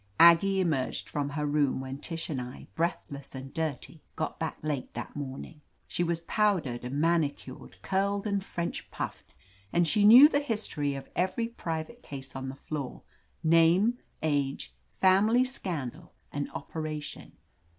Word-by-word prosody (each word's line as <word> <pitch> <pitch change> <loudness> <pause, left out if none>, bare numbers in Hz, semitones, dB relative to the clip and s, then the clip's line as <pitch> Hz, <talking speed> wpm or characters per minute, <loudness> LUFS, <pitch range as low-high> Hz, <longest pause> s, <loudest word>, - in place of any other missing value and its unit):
^.Aggie 180 +3 +7
emerged 155 -8 0
from 145 -1 -2
her 150 +1 -2
room 145 -2 +1
when 135 +1 -6
Tish 165 +1 -3
and 135 -5 -2
I, 125 +1 -8
breathless 145 -5 -3
and 130 +1 -8
dirty, 160 0 -3
got 155 - -3
back 160 -1 -3
late 150 -4 -2
that - - -6
morning. 145 +2 -7 0.3
She 175 - 0
was 170 -1 -1
pow 210 +2 +2
dered 125 -6 -6
and 130 +3 -3
manicured, 165 -2 -1
curled 200 +1 0
and 200 -2 0
French 170 -3 -4
puffed, - - -6 0.4
and 175 -1 +3
she 210 +5 +3
knew 240 +7 +11
the 285 -2 +1
history 210 - -1
of 135 - -7
every 190 +6 0
private 175 +1 -5
case 135 -2 -8
on 135 0 -4
the 135 - -6
floor; 140 -2 -6 0.4
name, 170 +9 +4 0.2
age, 140 - -1 0.2
family 205 - +4
scandal 175 - -5 0.2
and 145 0 -3
operation. 155 0 -6
160 Hz, 150 wpm, -29 LUFS, 140-190 Hz, 0.4 s, knew